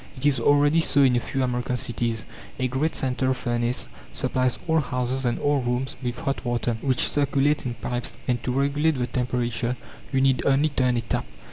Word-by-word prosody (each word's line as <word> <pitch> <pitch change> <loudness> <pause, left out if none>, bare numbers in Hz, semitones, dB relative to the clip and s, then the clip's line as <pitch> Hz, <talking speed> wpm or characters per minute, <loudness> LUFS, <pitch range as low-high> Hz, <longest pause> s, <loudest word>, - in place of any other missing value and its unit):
It 130 - -5
is 140 -4 +4
already 145 +5 +4
so 140 -3 +3
in 130 -2 +4
a - - +3
few 135 +2 -2
American 125 0 -1
cities. 115 -1 -2 0.3
A 130 - 0
great 135 +6 -1
central 130 0 0
furnace 120 0 -1 0.3
supplies 130 -1 0
all 160 0 +3
houses 125 -1 -1
and 120 - +1
all 145 -1 +1
rooms 125 +2 -2
with 125 -1 -3
hot 135 +1 -2
water, 120 -1 -1
which 130 -3 +2
circulates 145 0 +1
in 120 - -3
pipes; 120 +1 -3
and 120 -2 0
to 125 - -1
regulate 140 +3 +1
the 125 - 0
temperature 125 -1 -1 0.3
you 135 - +2
need 130 -2 +3
only 140 +3 +3
turn 125 -3 +1
a - - +1
tap. 115 - -2
130 Hz, 195 wpm, -25 LUFS, 120-140 Hz, 0.3 s, is